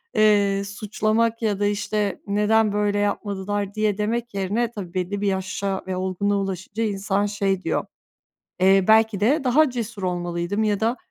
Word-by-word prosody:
eee, 205 Hz, -2 st, +3 dB
suçlamak 215 Hz, +3 st, -1 dB
ya 210 Hz, -3 st, 0 dB
da, 205 Hz, -, +1 dB
işte, 205 Hz, -1 st, -1 dB
neden 210 Hz, +1 st, +2 dB
böyle 205 Hz, 0 st, +1 dB
yapmadılar 205 Hz, 0 st, -2 dB
diye 215 Hz, -2 st, 0 dB
demek 235 Hz, +2 st, -2 dB
yerine, 210 Hz, +5 st, -1 dB
tabii, 190 Hz, -6 st, -7 dB
belli 190 Hz, +2 st, -2 dB
bir 205 Hz, -, 0 dB
yaşa 190 Hz, 0 st, -2 dB
ve 185 Hz, -, -2 dB
olgunluğa 190 Hz, +2 st, 0 dB
ulaşınca 195 Hz, +3 st, -3 dB
insan 200 Hz, -1 st, 0 dB
şey 195 Hz, -2 st, -1 dB
diyor, -, -, -1 dB, 0.7 s
eee, 190 Hz, 0 st, +5 dB
"Belki 220 Hz, -2 st, +4 dB
de 275 Hz, +10 st, +3 dB
daha 280 Hz, +3 st, +4 dB
cesur 230 Hz, -4 st, -5 dB
olmalıydım." 175 Hz, +3 st, -1 dB
ya 210 Hz, -2 st, +1 dB
da 230 Hz, +3 st, 0 dB
205 Hz, 155 wpm, -23 LUFS, 195-215 Hz, 0.7 s, eee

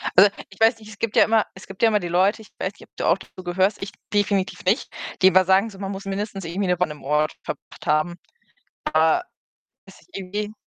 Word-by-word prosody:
Also, 200 Hz, +2 st, +8 dB, 0.2 s
ich 195 Hz, -, -17 dB
weiß 225 Hz, +1 st, +5 dB
nicht, 215 Hz, -, -14 dB
es 215 Hz, -, -11 dB
gibt 230 Hz, -2 st, -2 dB
ja -, -, +8 dB
immer 220 Hz, -1 st, +3 dB
es 195 Hz, -, -12 dB
gibt 195 Hz, -, -11 dB
ja 230 Hz, -, +6 dB
immer 210 Hz, -1 st, +2 dB
die 175 Hz, -, -4 dB
Leute, 190 Hz, +6 st, +2 dB
ich 215 Hz, -, -15 dB
weiß 185 Hz, -, -2 dB
nicht, -, -, -16 dB
ob -, -, -21 dB
du -, -, -3 dB
auch 170 Hz, -, +4 dB
dazu 185 Hz, -1 st, -13 dB
gehörst, 185 Hz, +3 st, +1 dB
ich 195 Hz, -, -5 dB, 0.2 s
definitiv 200 Hz, -2 st, 0 dB
nicht, 200 Hz, +9 st, +2 dB, 0.3 s
die 190 Hz, -, +8 dB
immer 185 Hz, 0 st, +6 dB
sagen 190 Hz, +4 st, +3 dB
so, 200 Hz, -, -13 dB
man 195 Hz, -1 st, -4 dB
muss 195 Hz, 0 st, -7 dB
mindestens 195 Hz, -1 st, -4 dB
irgendwie 185 Hz, +4 st, -2 dB
ne 180 Hz, -, +3 dB
Woche -, -, +4 dB
an 180 Hz, -, -1 dB
'nem 150 Hz, -1 st, -9 dB
Ort 150 Hz, +2 st, +1 dB
verbracht -, -, -8 dB
haben. 155 Hz, +2 st, +1 dB, 0.8 s
Aber, 160 Hz, -, +4 dB, 0.6 s
ist -, -, -17 dB
irgendwie 205 Hz, +2 st, -4 dB
195 Hz, 240 wpm, -23 LUFS, 180-205 Hz, 0.8 s, Also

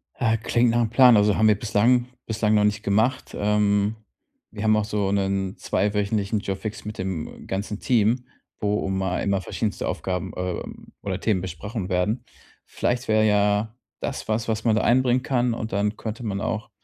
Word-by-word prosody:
Ah, 115 Hz, -1 st, +1 dB
klingt 120 Hz, +2 st, +2 dB
nachm 120 Hz, -1 st, +1 dB
Plan, 125 Hz, 0 st, +7 dB
also 105 Hz, 0 st, +4 dB
haben 110 Hz, -, +4 dB
wir 105 Hz, -2 st, +3 dB
bislang 120 Hz, +3 st, +2 dB, 0.2 s
bislang 110 Hz, -1 st, +1 dB
noch 105 Hz, -, +4 dB
nicht 105 Hz, +1 st, +1 dB
gemacht. 110 Hz, +6 st, 0 dB
Ähm, 105 Hz, 0 st, +2 dB, 0.6 s
wir 105 Hz, -1 st, -6 dB
haben 110 Hz, 0 st, +4 dB
auch 105 Hz, -1 st, +1 dB
so 105 Hz, -2 st, -1 dB
'nen 95 Hz, -1 st, -1 dB
2- 100 Hz, +3 st, 0 dB
wöchentlichen 105 Hz, +1 st, 0 dB
Jour 100 Hz, -1 st, -3 dB
fixe 105 Hz, 0 st, -6 dB
mit 105 Hz, -, -6 dB
dem 95 Hz, -4 st, -5 dB
ganzen 100 Hz, +2 st, -3 dB
Team, 120 Hz, 0 st, +2 dB, 0.3 s
wo 105 Hz, -1 st, 0 dB
um 95 Hz, 0 st, -1 dB
a 95 Hz, -, -1 dB
immer 90 Hz, -, -1 dB
einmal 100 Hz, -1 st, 0 dB
verschiedenste -, -, -3 dB
Aufgaben, 90 Hz, -2 st, -3 dB
ähm, 90 Hz, -1 st, -5 dB
oder 95 Hz, -1 st, -3 dB
Themen 100 Hz, -4 st, +1 dB
besprochen 95 Hz, +3 st, -5 dB
werden. 95 Hz, +6 st, 0 dB, 0.4 s
Vielleicht 125 Hz, +1 st, -2 dB
wäre 110 Hz, 0 st, +3 dB
ja 105 Hz, +1 st, +2 dB, 0.3 s
das 140 Hz, -, -4 dB
was, 110 Hz, +1 st, -1 dB
was 110 Hz, -1 st, -1 dB
man 115 Hz, -2 st, +3 dB
da 110 Hz, -, +2 dB
einbringen 125 Hz, +1 st, +3 dB
kann 125 Hz, -3 st, +1 dB
und 110 Hz, -1 st, -5 dB
dann 105 Hz, +2 st, 0 dB
könnte 115 Hz, +2 st, -5 dB
man 100 Hz, -2 st, -2 dB
auch 110 Hz, +1 st, -3 dB
105 Hz, 190 wpm, -24 LUFS, 100-115 Hz, 0.6 s, Plan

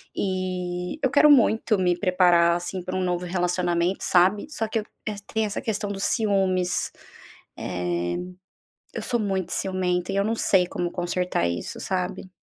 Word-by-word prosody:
E 185 Hz, -, -3 dB
eu 265 Hz, -, +4 dB
quero 300 Hz, +1 st, +6 dB
muito 225 Hz, -5 st, +4 dB
me 180 Hz, -1 st, +2 dB
preparar, 175 Hz, -3 st, +4 dB
assim, 180 Hz, +1 st, -5 dB
pra 185 Hz, +1 st, -4 dB
um 185 Hz, -, 0 dB
novo 180 Hz, 0 st, -1 dB
relacionamento, 180 Hz, 0 st, 0 dB
sabe? 185 Hz, +3 st, +3 dB
Só 225 Hz, -7 st, -2 dB
que 225 Hz, +1 st, -1 dB
eu -, -, -4 dB, 0.3 s
eh, 210 Hz, -, -4 dB, 0.2 s
tem 220 Hz, 0 st, +1 dB
essa 205 Hz, -, -3 dB
questão 210 Hz, -2 st, -2 dB
do 195 Hz, -, -5 dB
ciúmes. 190 Hz, -4 st, +1 dB, 0.7 s
Eh, 85 Hz, -1 st, -2 dB, 0.8 s
eu -, -, -4 dB
sou 240 Hz, -, 0 dB
muito 190 Hz, -4 st, -1 dB
ciumenta 180 Hz, -1 st, -1 dB
e -, -, -2 dB
eu 200 Hz, -, +2 dB
não 220 Hz, +2 st, 0 dB
sei 185 Hz, -4 st, +3 dB
como 175 Hz, 0 st, -3 dB
consertar 175 Hz, -, -1 dB
isso, 85 Hz, 0 st, -4 dB
sabe. 185 Hz, 0 st, -3 dB
185 Hz, 165 wpm, -25 LUFS, 175-200 Hz, 0.8 s, quero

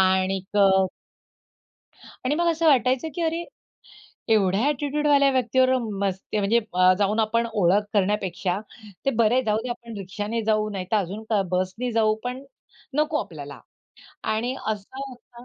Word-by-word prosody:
आणि 190 Hz, 0 st, +2 dB
क 200 Hz, -1 st, +6 dB, 1.6 s
आणि 275 Hz, +4 st, +1 dB
मग 345 Hz, +2 st, +1 dB
असं 325 Hz, 0 st, +1 dB
वाटायचं, 260 Hz, 0 st, +3 dB
की 345 Hz, -, -3 dB
अरे! 330 Hz, +1 st, -1 dB, 0.9 s
एवढ्या 195 Hz, -2 st, +3 dB
ॲटिट्यूडवाल्या 290 Hz, 0 st, +2 dB
व्यक्ती 255 Hz, -1 st, +1 dB
बरोबर 255 Hz, -2 st, +3 dB, 0.2 s
मस्ती 190 Hz, +3 st, -3 dB
म्हणजे 210 Hz, +3 st, +3 dB, 0.2 s
अ, 185 Hz, 0 st, +6 dB
जाऊन 210 Hz, +2 st, +1 dB
आपण 230 Hz, +2 st, +1 dB
ओळख 200 Hz, 0 st, +3 dB
करण्यापेक्षा, 195 Hz, -2 st, 0 dB, 0.5 s
ते 275 Hz, -, +3 dB
बरे 240 Hz, +4 st, +3 dB
जाऊ 215 Hz, 0 st, +2 dB
दे 250 Hz, -, -5 dB
आपण 235 Hz, -2 st, -7 dB
रिक्षा 200 Hz, +2 st, -5 dB
नी 230 Hz, +2 st, -2 dB
जाऊ, 215 Hz, -1 st, +1 dB
नाहीतर 195 Hz, +1 st, -2 dB
अजून 205 Hz, +3 st, -3 dB, 0.3 s
बस 185 Hz, 0 st, 0 dB
ने 250 Hz, 0 st, -1 dB
जाऊ. 220 Hz, -1 st, +3 dB
पण 250 Hz, +2 st, -4 dB, 0.6 s
नको 305 Hz, 0 st, +2 dB
आपल्याला 145 Hz, -5 st, -10 dB, 0.7 s
आणि 240 Hz, +4 st, -1 dB
असं 215 Hz, +5 st, -4 dB
होता 245 Hz, -1 st, -15 dB
220 Hz, 150 wpm, -24 LUFS, 195-255 Hz, 1.6 s, क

